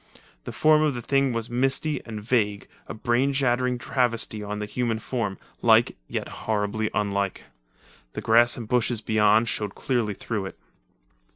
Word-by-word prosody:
The - - -5
form 155 0 +4
of 150 -4 +1
the 120 - -4
thing 135 +1 +2
was 115 -1 -3
misty 135 +4 +1
and 110 -2 -6
vague, 105 -4 0 0.2
a - - -5
brain 120 +5 +1
shattering 125 -2 +1
travesty 120 -3 0
on 105 0 -5
the 105 - -3
human 115 +1 -2
form, 110 -4 -3 0.2
like, - - +4
yet - - -4
horribly 110 0 -2
unlike. 100 -2 -1 0.7
The - - -5
grass 120 +1 +4
and 115 -3 -6
bushes 120 -1 +1
beyond 110 +1 +3
showed 105 -2 -3
clearly 115 -6 -1
through 105 -2 -4
it. - - -11
115 Hz, 160 wpm, -25 LUFS, 105-125 Hz, 0.7 s, form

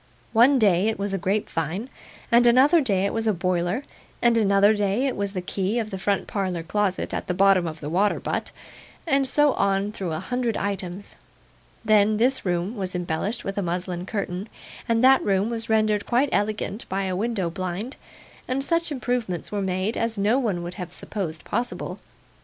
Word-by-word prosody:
One 250 +5 +6
day 200 -4 +3
it 220 - 0
was 200 0 -2
a 195 - -1
grapevine, 190 - -2 0.4
and 240 +1 +6
another 275 +8 +6
day 200 -7 +1
it 200 - -1
was 225 0 -1
a 215 - +3
boiler, 180 +6 -1 0.4
and 235 -1 +3
another 200 -1 +4
day 205 +4 0
it 270 - -1
was 200 0 -2
the 185 -2 -3
key 195 +4 -1
of 220 -2 -2
the 190 - -4
front 200 +1 0
parlour 185 -4 -2
closet 195 +2 -1
at - - -3
the 180 - -1
bottom 195 -2 +4
of 160 0 -7
the 145 - -5
water 195 +6 +1
butt, - - -3 0.6
and 275 -4 +2
so 295 +1 +4
on 195 +1 +1
through 190 -6 -4
a 155 - -2
hundred 240 +3 -2
items. 195 -1 -4 0.7
Then, 215 0 +4
this 255 +4 +2
room 180 +4 -1
was 190 -3 -4
embellished 180 +6 -2
with 195 +1 -3
a - - 0
muslin 180 0 -3
curtain, 200 -1 -4 0.4
and 230 +1 +2
that 265 +1 +6
room 200 +3 +1
was 225 -1 -3
rendered 215 -2 +2
quite 255 +4 +2
elegant 210 +1 -2
by 195 +1 -1
a 185 -1 -2
window 200 -4 -1
blind, 185 - -4 0.5
and 260 +2 0
such 335 +2 +1
improvements 245 - -2
were 205 -1 -1
made, 190 +3 -1
as 230 -1 -1
no 210 +6 +2
one 200 -9 -1
would 175 +1 -5
have 175 -1 -6
supposed 165 -7 -5
possible. 240 +4 -3
200 Hz, 190 wpm, -24 LUFS, 185-230 Hz, 0.7 s, One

